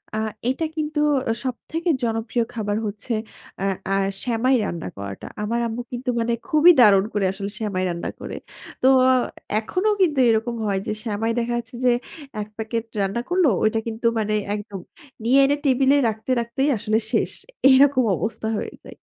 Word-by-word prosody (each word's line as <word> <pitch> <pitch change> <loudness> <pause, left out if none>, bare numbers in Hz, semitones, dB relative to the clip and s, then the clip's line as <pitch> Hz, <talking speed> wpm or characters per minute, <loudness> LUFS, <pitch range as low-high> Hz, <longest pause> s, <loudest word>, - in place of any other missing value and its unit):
আ - - -1 0.3
এইটা 265 +6 0
কিন্তু 300 -1 -1 0.5
সবথেকে 325 +7 -3
জনপ্রিয় 225 +1 0
খাবার 210 -3 -2
হচ্ছে 210 +4 -5 0.5
আ - - -1 0.3
আ - - +3 0.3
সেমাই 250 +2 +2
রান্না 170 -5 -4
করাটা। 100 -1 -7 0.2
আমার 225 +3 -1
আম্মু 230 +2 -4
কিন্তু 250 +1 -4
মানে 235 +1 0
খুবই 330 +1 +7
দারুণ 200 -4 +6
করে 205 -2 +1
আসলে 195 +1 -5
সেমাই 200 -4 -1
রান্না 170 -1 -3
করে। - - -6 0.5
তো 260 - +4 0.7
এখনও 365 - 0
কিন্তু 305 -7 +3
এরকম 225 +1 +1
হয় 195 -1 0
যে - - -1
সেমাই 225 +1 -1
দেখা 240 0 -1
যাচ্ছে 240 +1 -6
যে - - +6 0.5
এক 210 - -5
প্যাকেট 225 +1 -2 0.2
রান্না 195 +4 -1
করল, 360 0 +3 0.2
ওইটা 220 +1 +2
কিন্তু 225 +1 -5
মানে 215 0 -1 0.2
একদম 205 -2 -7 0.4
নিয়ে 255 +4 +4
এনে 280 +1 +2
টেবল 265 0 +3
এ - - +4
রাখতে, 220 +3 -4
রাখতেই 235 +5 -1
আসলে 215 +1 0
শেষ। - - +1 0.4
এরকম 265 0 +5
অবস্থা 220 +4 -3
হয়ে - - -5
যায়। - - -12
230 Hz, 165 wpm, -23 LUFS, 210-260 Hz, 0.7 s, খুবই